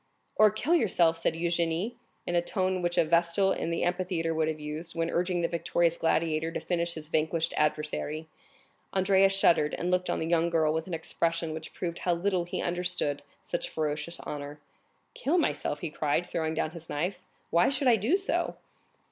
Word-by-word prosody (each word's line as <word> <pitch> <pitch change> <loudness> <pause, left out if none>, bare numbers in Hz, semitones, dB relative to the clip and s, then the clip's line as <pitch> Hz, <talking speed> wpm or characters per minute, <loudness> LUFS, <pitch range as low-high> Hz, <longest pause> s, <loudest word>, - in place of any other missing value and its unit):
"Or 215 0 +7
kill 230 - 0
yourself!" 175 - +3
said 165 - 0
Eugénie 170 +5 0 0.3
(in 175 - -2
a 175 - +4
tone 185 0 -1
which 175 0 -1
a 170 - +5
Vestal 170 +4 +3
in - - -1
the 170 - -1
amphitheatre 175 -2 0
would 160 -1 +1
have 155 -1 -2
used, 155 +3 -6
when 165 0 -1
urging 175 0 0
the 170 - +2
victorious 170 0 +1
gladiator 160 -1 +1
to - - -3
finish 170 -1 -1
his 155 -1 -7
vanquished 160 +1 0
adversary). 150 +1 -1 0.7
Andrea 195 0 +4
shuddered, 170 -6 +3
and 175 +1 -1
looked 180 0 +1
on - - +1
the - - -2
young 170 0 +2
girl 160 -2 +2
with 160 +1 -2
an 175 - -2
expression 165 0 -1
which 160 0 -7
proved 170 -1 -4
how 175 -1 +1
little 180 0 0
he 175 - -3
understood 175 -5 -1 0.2
such 175 - -3
ferocious 155 +2 -3
honor. 145 0 -6 0.5
"Kill 360 - 0
myself?" 220 - 0
he 165 - -4
cried, 155 +3 0
throwing 160 -2 -2
down 155 - -1
his 165 -1 -9
knife; 175 +5 -3 0.2
"why 170 +1 +4
should 275 0 0
I 240 - +7
do 225 - +2
so?" 390 - -1
170 Hz, 190 wpm, -29 LUFS, 160-180 Hz, 0.7 s, Or